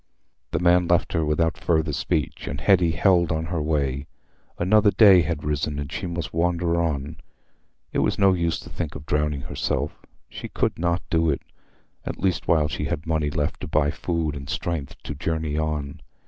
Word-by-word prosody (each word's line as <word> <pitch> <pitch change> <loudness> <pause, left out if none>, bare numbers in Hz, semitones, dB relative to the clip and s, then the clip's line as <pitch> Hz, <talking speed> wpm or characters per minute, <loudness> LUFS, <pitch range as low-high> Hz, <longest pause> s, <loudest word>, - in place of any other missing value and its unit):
The - - -1
man 90 0 +4
left 85 0 +2
her 80 - +1
without 80 +2 0
further 80 -3 +1
speech, 75 0 -2
and 70 - -4
Hetty 90 0 +4
held 85 0 +3
on 80 0 -1
her 80 -1 -2
way. 70 -2 -1 0.5
Another 105 +4 +4
day 100 -4 +7
had 80 -1 -2
risen, 75 0 -1
and 70 -1 -5
she - - -4
must 85 -5 -4
wander 85 0 +1
on. 75 -2 -2 0.8
It - - +1
was - - +1
no 95 -1 +5
use 85 -2 0
to - - -11
think 80 -4 -4
of 70 - -8
drowning 75 -2 0
herself—she 65 - -5
could - - -1
not 85 0 0
do 80 -1 +3
it, 70 - -1 0.6
at - - -5
least 95 -3 0
while 80 -3 +3
she - - -3
had 75 - -3
money 80 -2 0
left 75 0 -2
to - - -5
buy 75 -1 +2
food 80 -3 -2
and 70 -1 -8
strength 80 -3 -3
to - - -5
journey 80 +1 -2
on. 75 -2 -2
80 Hz, 185 wpm, -24 LUFS, 75-85 Hz, 0.8 s, day